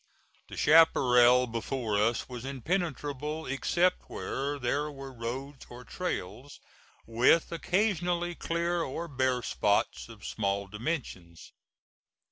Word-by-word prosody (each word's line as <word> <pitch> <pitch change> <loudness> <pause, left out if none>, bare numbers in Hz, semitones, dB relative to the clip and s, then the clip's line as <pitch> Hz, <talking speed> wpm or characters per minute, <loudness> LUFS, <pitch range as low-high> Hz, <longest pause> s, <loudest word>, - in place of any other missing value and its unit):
The - - -10
chaparral 125 -6 +6
before 115 -1 -3
us 110 +3 +1
was 125 -2 -7
impenetrable 150 +1 -3
except 175 +7 0
where 140 +2 -3
there 145 +3 -1
were 135 -1 -9
roads 130 +4 -6
or 120 +1 -10
trails, 130 - -5 0.5
with 120 +8 +3
occasionally 175 -1 0
clear 170 +1 -1
or 165 +3 -4
bare 130 -4 0
spots 105 +2 0
of 110 -2 -12
small 100 -1 -1
dimensions. 105 - -5
135 Hz, 105 wpm, -29 LUFS, 120-165 Hz, 0.5 s, chaparral